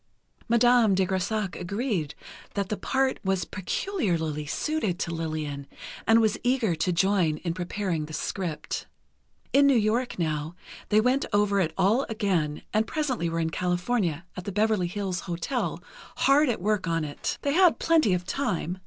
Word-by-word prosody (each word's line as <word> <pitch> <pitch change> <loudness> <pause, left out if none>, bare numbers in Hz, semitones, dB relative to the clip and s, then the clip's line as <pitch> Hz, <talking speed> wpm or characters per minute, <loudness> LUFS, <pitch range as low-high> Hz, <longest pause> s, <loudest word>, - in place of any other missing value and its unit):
Madame 235 -3 +5
de 190 0 +2
Grésac 190 +2 -1
agreed 200 - -2 0.4
that 200 -1 -1
the 210 - 0
part 265 +4 0
was 190 -1 0
peculiarly 175 - -2
suited 260 - -1
to 170 -3 -3
Lillian, 155 -4 -4 0.4
and 225 0 +6
was 220 -2 +2
eager 245 -6 +1
to 165 +3 0
join 180 -3 +2
in 170 -2 -1
preparing 180 -2 -2
the 155 - -9
script. 170 -2 -4 0.7
In 280 +1 +6
New 275 -3 +5
York, 230 +3 0
now, 155 -1 -2 0.3
they 210 - +5
went 250 +5 +2
over 205 -1 +2
it 165 -4 +1
all 225 +8 +3
again, 180 -9 -1
and 215 +1 +2
presently 265 - -1
were 165 0 -2
in 160 0 -1
California, 180 -1 -1
at 180 - -7
the 200 - -3
Beverley 210 -2 +1
Hills 185 0 -3
Hotel, 175 +10 -3 0.3
hard 285 +1 +4
at 225 - -1
work 210 -3 +1
on 165 -1 0
it. 145 - -4
They 280 - +1
had 360 0 +5
plenty 315 - +3
of 180 0 -4
time. 185 - -2
195 Hz, 160 wpm, -27 LUFS, 170-230 Hz, 0.7 s, and